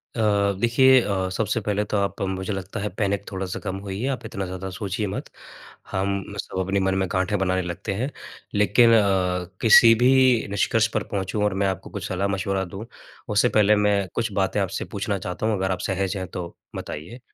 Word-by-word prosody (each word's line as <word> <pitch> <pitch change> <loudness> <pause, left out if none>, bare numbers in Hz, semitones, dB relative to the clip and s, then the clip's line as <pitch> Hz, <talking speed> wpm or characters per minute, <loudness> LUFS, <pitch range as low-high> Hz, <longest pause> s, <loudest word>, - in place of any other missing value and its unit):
अ, - - -4 0.4
देखिए 130 +3 +5
अ, 95 -3 -1
सबसे 110 +3 0
पहले 105 0 0
तो 105 - +2
आप 100 0 -1
मुझे 95 +1 -2
लगता 95 +1 -5
है 105 +1 -2
पैनिक 100 -1 0
थोड़ा-सा 95 -1 -4
कम 95 -2 -4
होइए, 100 +6 -3
आप 125 -4 -3
इतना 100 -3 -4
ज़्यादा 95 +1 -6
सोचिए 100 +2 -3
मत। 95 - -5 0.6
हम 100 +1 -2
सब 95 - -6
अपने 95 +1 0
मन 95 0 +1
में 95 -1 0
गाँठें 95 +2 0
बनाने 95 -1 +1
लगते 90 +2 -4
हैं, 125 +8 -2 0.4
लेकिन 105 +3 +5
अ, 95 -4 +2 0.2
किसी 115 0 +8
भी 130 - +6 0.4
निष्कर्ष 110 +2 +2
पर - - 0
पहुँचूँ 100 +2 -1
और 105 -2 +1
मैं - - +2
आपको 95 -2 -4
कुछ - - -5
सलाह-मशवरा 95 0 -1
दूँ, 95 +5 -8 0.4
उससे 105 +3 +3
पहले 105 0 +4
मैं 105 -2 +2
कुछ - - -1
बातें - - 0
आपसे - - -3
पूछना 100 0 -1
चाहता 90 +3 -4
हूँ? 110 -1 +2
अगर 95 0 -1
आप 90 - -2
सहज 95 +1 -1
हैं, 95 -1 -4
तो 85 -1 -7 0.2
बताइए। 85 +11 -7
100 Hz, 195 wpm, -24 LUFS, 95-105 Hz, 0.6 s, किसी